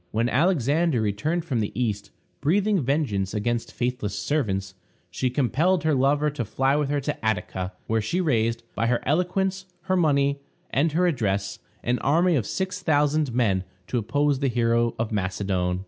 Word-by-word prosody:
When 115 +2 0
Alexander 155 -1 +2
returned 110 - -1
from 130 -8 -1
the 105 - -1
East, 105 -5 -1 0.3
breathing 195 +5 +2
vengeance 120 -8 -1
against 115 +2 -1
faithless 120 -4 -2
servants, 95 -10 -1 0.4
she 125 +8 -1
compelled 145 +8 +1
her 160 -1 +2
lover 145 +3 +2
to 140 -4 -3
fly 135 +5 +1
with 150 -2 0
her 145 0 +1
to 145 -3 -4
Attica, 95 -3 -2
where 115 0 0
she 140 - -1
raised, 115 -8 +1
by 115 - 0
her 125 0 +1
eloquence, 185 +4 0
her 185 +1 0
money, 140 -5 +2 0.3
and 150 +3 +1
her 180 +3 +3
address, 100 - -1 0.2
an 120 +1 0
army 170 +5 +3
of 115 -7 0
six 185 -1 -3
thousand 150 -2 +2
men 100 -7 +2 0.2
to 120 - -1
oppose 145 +5 +1
the 140 - +1
hero 115 -1 +1
of 115 0 -2
Macedon. 95 -2 -1
130 Hz, 165 wpm, -25 LUFS, 110-155 Hz, 0.4 s, her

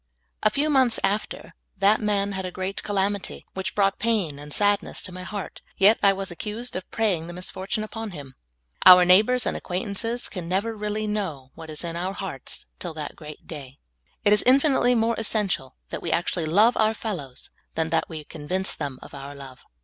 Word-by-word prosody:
A 215 - +4
few 290 +8 0
months 260 -4 +4
after, 205 +2 -2 0.2
that 200 +3 +4
man 205 -1 +1
had 190 -1 -3
a 185 - -3
great 185 +2 -4
calamity 200 -1 -1
which 190 0 -4
brought 195 -1 +2
pain 200 -11 0
and 145 0 -10
sadness 205 +4 +1
to 185 - -7
my 185 0 -7
heart; 200 +1 -6 0.2
yet 205 +3 +6
I 200 - +6
was 195 -1 -3
accused 215 +7 -5
of 185 - -5
prajnng 190 -8 0
the 175 - -7
misfortune 190 +4 -3
upon 225 0 -5
him. 145 -7 -9 0.5
Our 180 -1 +10
neighbors 215 +7 +5
and - - 0
acquaintances 205 +6 -1
can 175 -4 -6
never 205 +5 0
reall}^ 210 0 -2
know 160 -11 -3
what 160 -1 -10
is 155 +1 -4
in 170 -1 -3
our 180 +3 -2
hearts 190 - -6
till 160 - -5
that 150 -2 -5
great 150 -1 -11
day. 140 -4 -8 0.5
It 205 - +6
is 210 - +5
infi 275 +4 +6
nitely 245 -1 +3
more 225 +1 +2
essential 205 - -1
that - - -5
we - - -3
actually 170 -1 0
love 210 +9 +5
our 220 0 +3
fellows 165 - -6 0.2
than 160 -1 -1
that 165 - +1
we 155 -2 -6
convince 170 +6 -1
them 135 -2 -4
of - - -13
our 140 0 -8
love. 135 -2 -11
195 Hz, 195 wpm, -25 LUFS, 165-215 Hz, 0.5 s, Our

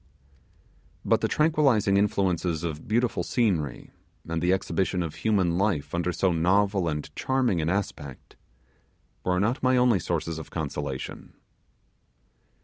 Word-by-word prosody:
But - - +2
the - - +1
tranquillizing 140 -11 +2
influence 100 -3 +1 0.2
of 80 -3 -5
beautiful 120 +2 +1
scenery, 90 - -1 0.4
and 80 0 -2
the 90 - +2
exhibition 95 -1 0
of 80 -3 -5
human 90 -1 +1
life 95 -8 0
under 85 +1 0
so 90 +2 +1
novel 95 +2 +2
and 75 -2 -3
charming 125 -10 +1
an 80 - -1
aspect 85 -8 -4 0.9
were 90 0 +1
not 110 +6 0
my 130 0 +3
only 125 -5 +4
sources 85 -2 -3
of 80 - -9
consolation. 75 -4 -5
90 Hz, 130 wpm, -26 LUFS, 80-105 Hz, 0.9 s, only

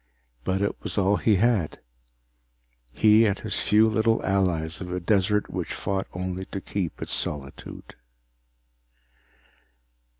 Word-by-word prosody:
But 95 +6 0
it 100 - 0
was - - -4
all 100 +1 +3
he 110 - +3
had, 105 -5 +1 1.1
he 110 +1 +5
and 100 -1 0
his 110 - -3
few 110 +1 +4
little 110 +1 +2
allies 90 -4 0
of 90 -1 -6
a 90 - -2
desert 100 +2 +1
which - - -4
fought 95 0 -2
only 90 +1 -4
to 100 - -6
keep 95 -3 -4
its - - -3
solitude. 70 -2 -4
95 Hz, 130 wpm, -25 LUFS, 90-105 Hz, 1.1 s, he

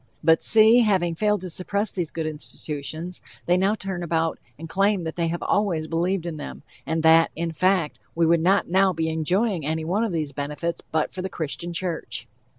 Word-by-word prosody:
But, 160 +1 +5
see, 220 +2 +6
having 190 -7 +2
failed 210 +3 +1
to 185 - -6
suppress 200 +4 -1
these 175 -4 -2
good 160 0 -4
institutions, 155 +2 -6 0.2
they 175 - +3
now 195 +3 +2
turn 190 -4 -5
about 165 -1 -1 0.2
and 165 +3 -8
claim 195 +2 +1
that 160 -1 -4
they 170 -1 0
have 170 +1 -3
always 185 -6 +1
believed 175 +2 -1
in 165 -3 -4
them, 150 - -8 0.2
and 160 0 -1
that, 165 0 +6
in 170 +1 -2
fact, 185 -1 +1 0.2
we 165 0 +3
would 165 0 +3
not 190 +4 +3
now 190 +1 +3
be 160 -1 -1
enjoying 175 +4 0
any 160 +2 -2
one 195 +7 0
of 225 - -1
these 155 -4 -2
benefits 150 +4 -4
but 155 -1 0
for 185 - -5
the 190 - -3
Christian 170 +1 -4
Church. 170 - -3
170 Hz, 200 wpm, -24 LUFS, 160-190 Hz, 0.2 s, see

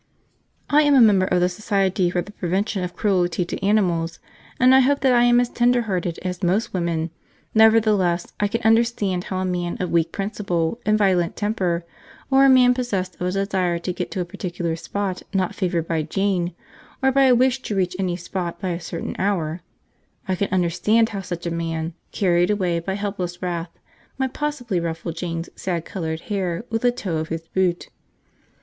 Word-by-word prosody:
I 295 +1 +5
am 290 -1 +4
a - - +7
member 200 -5 +5
of 180 -2 +2
the 180 - +4
Society 190 -1 0
for 175 0 -1
the 205 - -12
Prevention 195 +1 -1
of 180 0 -5
Cruelty 180 -4 +1
to 175 - -6
Animals, 180 -5 +1 0.4
and 255 0 +6
I 265 - +7
hope 280 +2 +3
that 265 -2 +4
I 240 0 +5
am 240 0 +5
as 245 - +2
tender 245 0 +2
hearted 180 -5 -2
as 180 0 -4
most 190 +5 0
women; 170 -2 -1 0.4
nevertheless, 215 -6 +3
I 205 - +2
can 230 +3 -3
understand 220 -5 +2
how 190 - -3
a 185 - -1
man 175 -1 -2
of 180 - -2
weak 165 -1 +2
principle 195 -2 -2
and 215 0 +4
violent 185 -5 +2
temper, 185 -5 -1 0.5
or 270 +1 +6
a - - +6
man 250 -1 +6
possessed 230 -7 -2
of 180 - 0
a - - 0
desire 190 -3 0
to 180 +2 -4
get - - -4
to 185 - -3
a - - -2
particular 175 -1 -4
spot 190 +2 -3
not 185 -2 +1
favoured 175 -4 -1
by 165 -2 0
Jane, 180 +1 -1 0.5
or 265 - +4
by 275 +1 +4
a 255 -2 +6
wish 255 +1 +2
to 210 - -4
reach 185 -2 0
any 180 -2 0
spot 175 0 -5
by 190 - -3
a 170 -1 -2
certain 170 - -5
hour, 175 -4 -1 0.7
I 190 - +1
can 195 +2 -1
understand 190 +5 +2
how 200 -3 -4
such 175 -2 -6
a 170 - -1
man, 165 0 -3 0.2
carried 175 -2 +2
away 185 -5 +1
by 190 +3 -3
helpless 190 -4 -4
wrath, 170 -1 -4 0.4
might 265 -1 -1
possibly 250 -10 -2
ruffle 165 0 -3
Jane's 165 0 -4
sad 175 -3 -3
coloured 160 -4 -4
hair 190 -1 -3
with 225 -1 0
the 245 - +3
toe 200 -9 -3
of 155 0 -3
his 165 0 -5
boot. 180 -2 0
185 Hz, 195 wpm, -22 LUFS, 175-215 Hz, 0.7 s, a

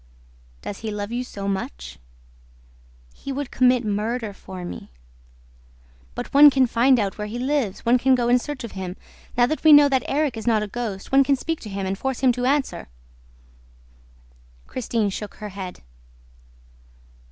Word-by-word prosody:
"Does 200 - -6
he 220 - -5
love 205 0 -4
you 245 +1 -2
so 200 -5 -7
much?" 65 - -5 1.1
"He 275 - -7
would 275 0 -4
commit 250 -1 +3
murder 215 +1 -2
for 185 -2 -9
me." - - -8 1.3
"But - - -6
one 290 +1 +9
can 265 -2 +3
find 250 +2 +3
out 200 -1 -2
where 210 - -3
he 220 +3 -5
lives. 255 -5 -1
One 245 +2 +4
can 260 +1 +4
go 240 -1 0
in 245 +1 +4
search 285 0 -6
of 235 - -6
him. 185 -1 -6 0.4
Now 240 - +5
that 310 +5 -3
we 315 - +7
know 290 -1 +9
that 265 -2 +2
Erik 285 -4 0
is 225 - -7
not 220 -2 +3
a - - -4
ghost, 205 -3 -5
one 275 +1 +6
can 275 +1 +2
speak 325 +4 -3
to 215 - -9
him 195 -1 -4
and 190 +1 -1
force 265 +5 -3
him 260 -2 +5
to 250 +1 -2
answer!" 280 0 -1 1.8
Christine 225 -4 -2
shook 205 +1 -6
her 210 -1 -7
head. 190 -2 -8
235 Hz, 175 wpm, -23 LUFS, 205-265 Hz, 1.8 s, one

